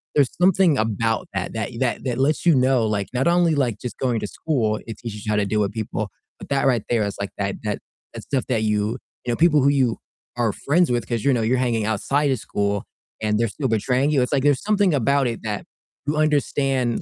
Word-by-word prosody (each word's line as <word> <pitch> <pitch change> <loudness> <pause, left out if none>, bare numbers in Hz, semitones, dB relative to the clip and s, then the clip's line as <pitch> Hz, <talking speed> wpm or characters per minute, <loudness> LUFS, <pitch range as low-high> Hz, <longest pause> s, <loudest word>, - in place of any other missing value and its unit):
there's 140 -4 +4
something 185 -4 +4
about 115 0 0
that - - -3
that - - -3
that - - -1
that 125 -2 -2
lets 140 +6 +1
you 170 -4 +6
know, 130 -2 +3
like, 105 -2 -1
not 130 +4 +1
only, 170 -2 +3
like, 125 -6 0
just 125 - -6
going 125 -4 0
to 105 - -4
school, 110 -6 -1
it 115 -2 -6
teaches 105 -3 -7
you 110 - -1
how - - +2
to 105 -1 +2
deal 105 +2 0
with 100 -1 0
people, 110 0 -3 0.3
but - - -10
that 140 -1 +1
right 125 -5 +2
there 115 -3 +2
is, 100 - -4
like, 100 0 -3
that 100 -1 -2
that, 105 -1 -2 0.3
that - - -8
stuff 135 -3 -1
that 115 -4 0
you 105 0 0 0.3
you 120 - -1
know, - - +1
people 155 -1 +4
who 135 - +3
you 130 -5 +2 0.4
are 115 -4 +1
friends 170 +5 +2
with 120 -1 0
'cause 115 -3 -2
you 140 - +4
know 120 - +1
you're 115 +4 +2
hanging 120 -3 0
outside 135 +7 +1
of 130 - 0
school, 100 -1 -1 0.4
and 105 -1 +1
they're 115 0 +1
still 135 +6 -3
betraying 125 +5 +1
you, 140 -4 +3
it's, 125 - -1
like, 140 -3 +1
there's 145 -2 +3
something 205 -4 +2
about 140 0 +2
it 115 -2 -4
that 105 -2 -3 0.4
you 150 - 0
understand, 135 -5 +1
125 Hz, 240 wpm, -22 LUFS, 110-140 Hz, 0.4 s, you